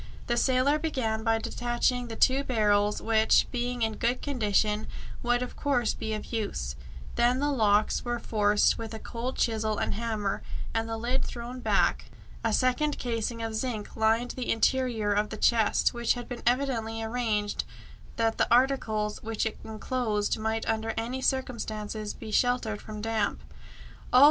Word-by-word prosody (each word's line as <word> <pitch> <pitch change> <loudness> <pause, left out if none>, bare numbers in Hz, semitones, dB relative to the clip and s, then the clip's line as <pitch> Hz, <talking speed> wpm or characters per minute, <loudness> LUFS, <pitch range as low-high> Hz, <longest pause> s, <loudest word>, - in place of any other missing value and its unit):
The 240 - 0
sailor 260 +4 +3
began 235 -9 -1
by 225 -1 +3
detaching 240 +2 -1
the 225 - -6
two 265 +4 +3
barrels, 210 -5 +2
which, 220 -1 +4
being 245 -1 -1
in 220 -1 -1
good 240 +2 +1
condition, 215 -5 +1 0.3
would 245 +1 +1
of 250 - -7
course 250 -6 +1
be 220 0 -3
of 215 - -7
use. 65 - -2 0.4
Then 245 +1 +4
the 290 +1 +1
locks 215 -5 +2
were 240 -1 -1
forced 210 -2 +2
with 225 -1 -5
a - - -6
cold 240 +3 -5
chisel 220 -2 0
and - - -1
hammer, 215 -3 -2 0.3
and 225 0 -1
the 225 - -2
lid 245 +4 0
thrown 245 +1 -6
back. - - +2 0.4
A 225 - +1
second 255 +6 +1
casing 230 -1 -2
of 225 -1 -3
zinc 220 -2 -3
lined 225 +2 +2
the 255 - -3
interior 225 -2 +1
of 210 +1 +1
the 215 - -6
chest, 225 0 +3
which 235 0 +1
had 245 -1 -6
been 245 - -6
evidently 235 -3 0
arranged 220 -3 -1 0.5
that 225 -1 0
the - - +2
articles 230 -4 +2
which 225 0 -2
it 220 - -3
enclosed 220 -1 -1
might 220 +1 -1
under 225 0 -1
any 240 +4 -2
circumstances 215 -5 -2
be 220 -2 -8
sheltered 245 -3 +1
from 215 -1 -7
damp. 220 -2 -1 0.7
"Oh!" 250 - +7
225 Hz, 165 wpm, -28 LUFS, 215-245 Hz, 0.7 s, Oh